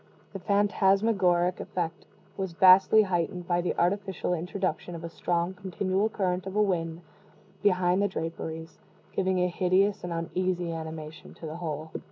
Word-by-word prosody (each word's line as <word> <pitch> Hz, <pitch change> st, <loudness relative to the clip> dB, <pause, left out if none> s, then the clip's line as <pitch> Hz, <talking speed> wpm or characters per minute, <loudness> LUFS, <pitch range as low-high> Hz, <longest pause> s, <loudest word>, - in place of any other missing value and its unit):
The 195 Hz, -, -5 dB
phantasmagoric 195 Hz, -2 st, +2 dB
effect 170 Hz, -2 st, -4 dB, 0.3 s
was 190 Hz, -3 st, -4 dB
vastly 190 Hz, +4 st, +7 dB
heightened 180 Hz, -1 st, -2 dB
by 175 Hz, 0 st, +1 dB
the 175 Hz, -, -1 dB
artificial 190 Hz, 0 st, 0 dB
introduction 180 Hz, +1 st, -3 dB
of 165 Hz, -, -8 dB
a 170 Hz, -, -5 dB
strong 175 Hz, +2 st, -1 dB
continual 190 Hz, +2 st, -1 dB
current 185 Hz, -3 st, -1 dB
of 190 Hz, -, -6 dB
wind 175 Hz, -5 st, 0 dB, 0.6 s
behind 185 Hz, -2 st, +3 dB
the 205 Hz, -, +3 dB
draperies 165 Hz, -2 st, -6 dB, 0.3 s
giving 190 Hz, -1 st, 0 dB
a 180 Hz, 0 st, +2 dB
hideous 190 Hz, +3 st, +1 dB
and 175 Hz, -, -4 dB
uneasy 175 Hz, +1 st, -2 dB
animation 160 Hz, -1 st, -8 dB
to -, -, -10 dB
the 155 Hz, +1 st, -6 dB
whole. 155 Hz, -2 st, -5 dB
180 Hz, 145 wpm, -28 LUFS, 170-195 Hz, 0.6 s, vastly